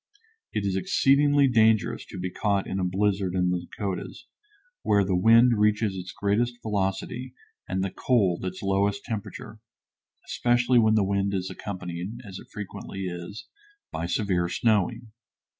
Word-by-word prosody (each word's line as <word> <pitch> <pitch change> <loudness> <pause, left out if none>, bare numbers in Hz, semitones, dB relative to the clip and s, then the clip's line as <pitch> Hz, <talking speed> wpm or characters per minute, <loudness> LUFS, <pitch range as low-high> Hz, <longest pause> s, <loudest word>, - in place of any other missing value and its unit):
It 105 - -2
is 95 -1 0
exceedingly 140 +8 +3
dangerous 110 -3 +2
to - - -9
be 90 0 -3
caught 100 -1 0
in 95 - -3
a - - 0
blizzard 95 0 0
in 90 -1 +2
the 90 - 0
Dakotas, 100 -4 -5 0.6
where 100 -1 +3
the 95 -1 0
wind 115 +4 +5
reaches 105 -1 +2
its 90 0 -6
greatest 120 +4 0
velocity 105 +5 -2 0.3
and 95 0 -1
the 95 - -2
cold 100 -9 +1
its 95 +1 -5
lowest 100 +1 +1
temperature 110 0 -6 0.7
especially 120 +1 +2
when 110 -1 +4
the 105 - +3
wind 100 0 0
is 95 0 -3
accompanied, 90 +2 -6
as 95 -2 -8
it - - -14
frequently 100 -1 -7
is, 90 +3 -6 0.5
by 85 - -3
severe 90 -2 0
snowing. 110 +1 0
100 Hz, 150 wpm, -26 LUFS, 95-110 Hz, 0.7 s, wind